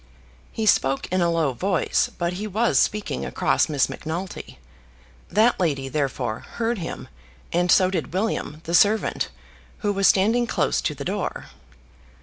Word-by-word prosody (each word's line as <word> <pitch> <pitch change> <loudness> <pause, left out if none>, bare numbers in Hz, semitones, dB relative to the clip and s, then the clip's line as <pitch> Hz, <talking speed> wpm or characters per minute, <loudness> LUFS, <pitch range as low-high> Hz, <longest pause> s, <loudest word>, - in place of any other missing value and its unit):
He 220 - -3
spoke 135 -9 +2
in 185 0 +1
a 170 - +3
low 165 -5 +1
voice, 185 +7 0
but 175 0 -1
he 205 +4 -4
was 220 +4 +2
speaking 205 - -1
across 70 - +1
Miss 145 -3 +2
Macnulty. 170 - -6 0.7
That 220 +4 +3
lady, 140 -7 0
therefore, 135 -6 -2
heard 235 -1 -1
him, 165 - -6 0.5
and 175 +1 +1
so 185 -1 +5
did 170 -5 -3
William, 185 -5 -2
the 170 - -5
servant, 210 +5 +3 0.6
who 205 - +2
was 195 0 +3
standing 225 +5 +3
close - - 0
to - - -2
the - - -7
door. - - -3
180 Hz, 150 wpm, -23 LUFS, 155-210 Hz, 0.7 s, so